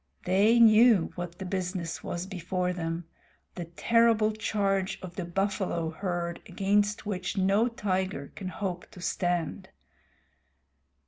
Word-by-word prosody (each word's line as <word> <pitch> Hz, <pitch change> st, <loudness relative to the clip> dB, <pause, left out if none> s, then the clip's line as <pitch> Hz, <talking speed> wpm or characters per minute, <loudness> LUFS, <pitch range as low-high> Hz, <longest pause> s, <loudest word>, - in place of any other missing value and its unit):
They 205 Hz, +6 st, +4 dB
knew 220 Hz, -4 st, +6 dB
what 175 Hz, -1 st, -6 dB
the 190 Hz, -, -6 dB
business 180 Hz, -2 st, -3 dB
was 175 Hz, +1 st, -4 dB
before 180 Hz, -1 st, -2 dB
them 165 Hz, -1 st, -3 dB, 0.5 s
the 175 Hz, -, -5 dB
terrible 225 Hz, +5 st, +3 dB
charge 200 Hz, -3 st, -1 dB
of 180 Hz, -1 st, -8 dB
the 185 Hz, -, -3 dB
buffalo 175 Hz, -2 st, -1 dB
herd 175 Hz, -1 st, -3 dB
against 205 Hz, +4 st, +1 dB
which 185 Hz, -3 st, -3 dB
no 195 Hz, +4 st, +3 dB
tiger 190 Hz, -, -2 dB
can 190 Hz, -, -6 dB
hope 185 Hz, -2 st, -4 dB
to -, -, -13 dB
stand. 175 Hz, -3 st, -2 dB
185 Hz, 125 wpm, -28 LUFS, 175-205 Hz, 0.5 s, knew